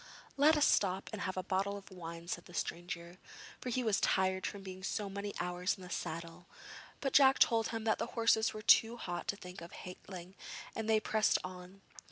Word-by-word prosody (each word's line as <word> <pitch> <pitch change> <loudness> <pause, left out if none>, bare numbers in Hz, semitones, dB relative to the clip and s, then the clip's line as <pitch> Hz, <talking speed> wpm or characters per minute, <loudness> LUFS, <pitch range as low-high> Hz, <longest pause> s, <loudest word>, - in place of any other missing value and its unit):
'Let 300 +3 +5
us 295 - +5
stop 190 -1 +2
and 210 - -4
have 185 -1 -3
a 185 - -1
bottle 195 +2 0
of 195 0 -12
wine,' 170 -2 -8
said 175 0 -4
the 175 - -12
stranger, 175 +1 -4 0.4
for 255 - -4
he 250 +1 0
was 220 -4 +2
tired 190 -1 +2
from 200 -1 -6
being 185 -1 -8
so 200 +1 -2
many 200 +1 -4
hours 180 +2 -1
in 190 - -11
the 180 - -9
saddle; 170 +2 -5 0.5
but 275 - -1
Jack 270 -1 +7
told 225 -2 +4
him 225 -1 -4
that 220 -1 +2
the - - -1
horses 225 -1 +4
were 215 0 -7
too 230 +2 +6
hot 175 -6 -4
to - - 0
think 180 -2 -10
of 170 - -9
halting, 180 0 -9 0.4
and 225 0 -3
they 220 -1 +5
pressed 215 0 +2
on. 185 +1 -9
190 Hz, 210 wpm, -34 LUFS, 180-220 Hz, 0.5 s, Jack